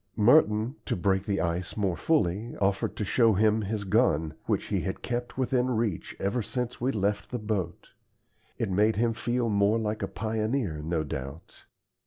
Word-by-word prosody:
Merton, 110 +1 +4
to - - 0
break 95 +2 0
the 100 -2 0
ice 85 +2 -2
more 95 -4 +1
fully, 110 - 0
offered 95 -1 0
to 105 - -2
show 115 +2 +4
him 110 +2 +3
his 105 0 -3
gun, 95 - +2
which - - 0
he - - 0
had - - -4
kept 120 +1 -3
within 130 -1 +1
reach 110 -7 -2
ever 100 +5 0
since 125 +2 -4
we 130 +2 +1
left 105 -2 -1
the 125 - -3
boat. 105 -7 -3 0.7
It - - -2
made 105 +4 +3
him 115 +2 +1
feel 120 +1 -1
more 100 +1 +3
like 110 -1 -2
a - - -1
pioneer, 110 - -2
no 80 0 -1
doubt. 70 +2 -7
105 Hz, 175 wpm, -28 LUFS, 95-115 Hz, 0.7 s, Merton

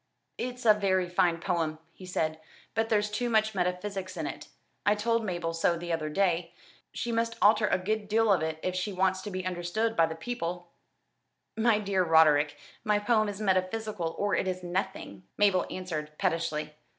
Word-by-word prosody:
"It's 250 0 -4
a 215 - +8
very 190 -3 +1
fine 175 -1 +2
poem," 165 -3 -1 0.2
he 185 - -12
said, 160 -3 -1 0.3
"but 225 +1 0
there's 210 -1 +1
too 240 +3 -1
much 220 -1 +2
metaphysics 185 0 -2
in 160 - -2
it. - - -6 0.4
I 205 - +3
told 230 +2 +1
Mabel 175 -4 -2
so 165 +1 +1
the 170 0 -3
other 155 -2 -2
day. 175 0 0 0.4
She 240 - -3
must 230 0 0
alter 210 +1 +5
a - - +2
good 210 +3 -2
deal 220 0 +3
of 180 - +1
it 160 0 -2
if 185 - -1
she 185 +3 -2
wants 190 0 +1
to 205 - -6
be 185 -1 -4
understanded 185 +5 -1
of 165 -1 +5
the 160 - -5
people." 175 -3 -5 0.8
"My 225 -1 +3
dear 195 -3 +1
Roderick, 155 -3 +4 0.3
my 210 -1 +2
poem 215 0 +2
is 200 0 -6
metaphysical 190 -2 -1
or 205 0 0
it - - +1
is 185 -1 -3
nothing," 175 - -3 0.2
Mabel 200 -3 +3
answered 155 -5 -5
pettishly. 165 -4 -1
185 Hz, 185 wpm, -29 LUFS, 170-210 Hz, 0.8 s, a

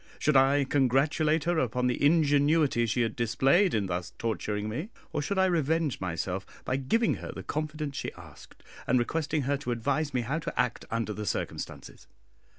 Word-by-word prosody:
Should 150 - +1
I 135 +2 +5
congratulate 145 +4 +2
her 170 0 +1
upon 125 -1 0
the 125 +2 0
ingenuity 145 -4 +3
she 120 +3 0
had 115 -2 -2
displayed 135 - +3
in 105 -2 +1
thus 90 -1 -4
torturing 105 -1 -2
me? 145 - -4 0.2
or 150 - 0
should 195 +7 -2
I 190 - +4
revenge 160 - 0
myself 90 +1 -2 0.2
by 130 - 0
giving 220 - +1
her - - -7
the - - -8
confidence 150 -2 -3
she - - -3
asked, - - -15 0.2
and 125 - +3
requesting 150 +4 0
her 140 +2 0
to 140 -2 -6
advise 140 +6 0
me 125 - 0
how 135 +7 -2
to 165 -3 -5
act 125 -1 0
under 115 -1 -2
the 105 0 -5
circumstances? - - -5
135 Hz, 180 wpm, -28 LUFS, 115-155 Hz, 0.2 s, I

